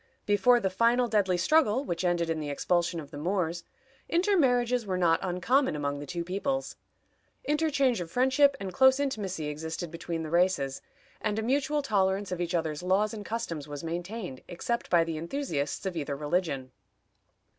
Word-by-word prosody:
Before 210 +4 +4
the 190 -5 -1
final 235 +5 +3
deadly 200 -5 +2
struggle 270 - +3
which 175 -5 -3
ended 175 -1 +1
in 165 -1 -1
the 150 -1 -4
expulsion 170 +4 0
of 145 -3 -9
the 145 - -7
Moors, 170 0 -1 0.5
intermarriages 255 - +2
were 190 -3 -2
not 170 -2 +3
uncommon 190 - +1
among 145 -1 -2
the 145 - -7
two 170 +3 -3
peoples. 270 +10 -2 0.7
Interchange 280 - +1
of 170 - -6
friendship 265 - +3
and 190 -2 -5
close 265 0 +5
intimacy 200 - -2
existed 160 +3 -5
between 165 0 -4
the 155 - -6
races, 170 -6 +1 0.4
and 210 0 -1
a 220 - -1
mutual 285 +4 +1
tolerance 195 -4 +1
of 180 -1 -2
each 175 +1 -1
other's 160 -2 -1
laws 195 +4 +1
and 210 -2 -6
customs 170 -10 -4
was 145 0 -7
maintained, 175 - -5
except 235 +7 -3
by 170 -2 +5
the 165 -1 -4
enthusiasts 165 - -3
of 190 -2 -2
either 145 -3 -3
religion. 145 -3 -2
185 Hz, 170 wpm, -29 LUFS, 165-240 Hz, 0.7 s, close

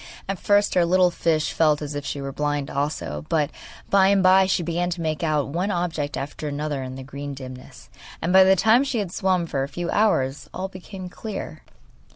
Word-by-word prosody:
At 195 -2 -3
first 205 0 +2
our 180 - +5
little 180 +1 +4
fish 160 -3 0
felt 155 -2 +3
as 150 -1 -5
if 145 0 -4
she 140 +1 -4
were 135 0 -4
blind 145 0 -2
also, 85 - -3
but 150 -3 +1 0.4
by 195 -1 +5
and 195 -1 +3
by 190 +1 +6
she 185 -2 +1
began 175 +2 -1
to 175 0 -4
make 155 -1 -2
out 150 -4 0
one 175 +7 -1
object 165 -6 -2
after 145 +2 -5
another 145 -1 -3
in 130 0 -6
the 135 - -7
green 140 +1 -7
dimness, 130 -1 -10 0.3
and 175 - -1
by 190 0 +9
the 190 0 +5
time 220 +7 +4
she 270 -3 -2
had 200 -5 -2
swum 185 -2 +1
for 140 -4 -2
a 135 - -1
few 175 +1 -4
hours 145 -11 +1
all 190 +1 -3
became 185 0 -9
clear. 180 -4 -7
165 Hz, 210 wpm, -24 LUFS, 145-185 Hz, 0.4 s, by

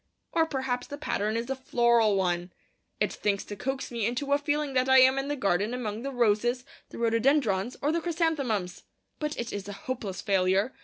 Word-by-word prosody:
Or 325 -1 +2
perhaps 260 -4 -2
the 285 - -7
pattern 215 -6 -1
is 230 +1 -3
a - - 0
floral 235 -4 +3
one. 175 -1 0 0.5
It - - 0
thinks 200 -1 -1
to 205 - -7
coax 265 +7 -4
me 230 -3 -1
into 275 +4 -1
a 285 - +3
feeling 290 -1 -1
that 255 0 +2
I 265 - +7
am 260 +1 +6
in 270 - -3
the 290 - -1
garden 205 0 0
among 220 -3 -4
the 275 - -3
roses, 240 +1 +1 0.2
the - - -10
rhododendrons, 230 -2 +1
or 295 - +2
the 335 +1 0
chrysanthemums. 285 - -1 0.4
But 300 -1 -3
it 235 0 -4
is 200 -1 -5
a 205 - -5
hopeless 210 -4 -5
failure. 195 +4 +1
240 Hz, 200 wpm, -28 LUFS, 205-270 Hz, 0.5 s, I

